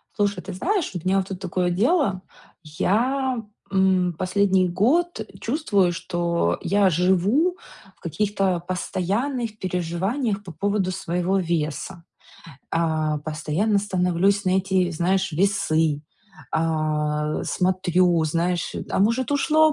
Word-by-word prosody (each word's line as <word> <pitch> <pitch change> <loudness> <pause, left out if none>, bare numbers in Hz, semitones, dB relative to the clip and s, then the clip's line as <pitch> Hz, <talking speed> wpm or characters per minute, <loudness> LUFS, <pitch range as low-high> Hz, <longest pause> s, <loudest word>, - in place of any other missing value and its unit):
Слушай, 205 -3 0
ты 190 - -6
знаешь, 365 - -1
у 180 - -3
меня 190 +1 +3
вот 190 -1 0
тут 190 -2 -5
такое 180 -1 -1
дело. 205 - +1 0.4
Я, 245 - 0 0.3
м, 190 -2 +2
последний 185 0 +2
год 250 - +1 0.2
чувствую, 205 - +1
что 170 - -1
я 200 +1 +3
живу 190 - +2 0.4
в - - -31
каких-то 195 +1 0
постоянных 210 +7 -2
переживаниях 190 - -2
по 185 - -9
поводу 195 +3 -1
своего 185 0 -1
веса. 170 +1 -3 0.7
Э, 155 -2 0
постоянно 160 +7 0
становлюсь 195 0 +1
на 185 - +1
эти, 190 -1 +1
знаешь, 185 +3 0
весы, 160 -4 +1 0.5
а, 155 -1 0
смотрю, 180 -2 +2
знаешь, 170 +2 -1
э, - - -4
а - - +1
может, 230 +6 +1
ушло 310 +2 +4
185 Hz, 120 wpm, -23 LUFS, 170-205 Hz, 0.7 s, ушло